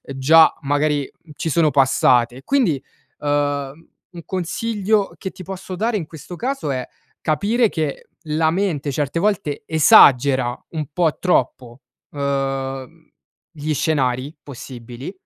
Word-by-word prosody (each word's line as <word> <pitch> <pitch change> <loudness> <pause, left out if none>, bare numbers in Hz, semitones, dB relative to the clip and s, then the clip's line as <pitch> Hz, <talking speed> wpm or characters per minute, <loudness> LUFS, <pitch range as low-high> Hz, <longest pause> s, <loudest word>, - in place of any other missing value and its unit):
già, 160 +4 +6
magari, 145 0 0 0.2
ci 160 - -3
sono 155 -1 +3
passate. 130 -2 +3
Quindi, 220 - +1 0.4
uhm, 145 +1 -2 0.2
un 175 - -9
consiglio 200 +3 -1
che 190 - -6
ti - - -12
posso 190 0 -7
dare 220 +4 0
in 175 - -4
questo 160 +3 -10
caso 260 - -3
è 130 -2 -3 0.3
capire 210 +10 +1
che 155 -6 -4 0.2
la 160 +1 +1
mente, 165 -6 -1
certe 145 +3 -2
volte, 170 -7 -1
esagera 130 -5 +5 0.2
un 155 -2 -3
po' 165 -2 +1
troppo, 130 -7 -1 0.3
uhm, 135 -2 -3 0.4
gli 155 0 -4
scenari 135 -2 -1
possibili, 125 +1 -9
150 Hz, 120 wpm, -20 LUFS, 135-175 Hz, 0.4 s, già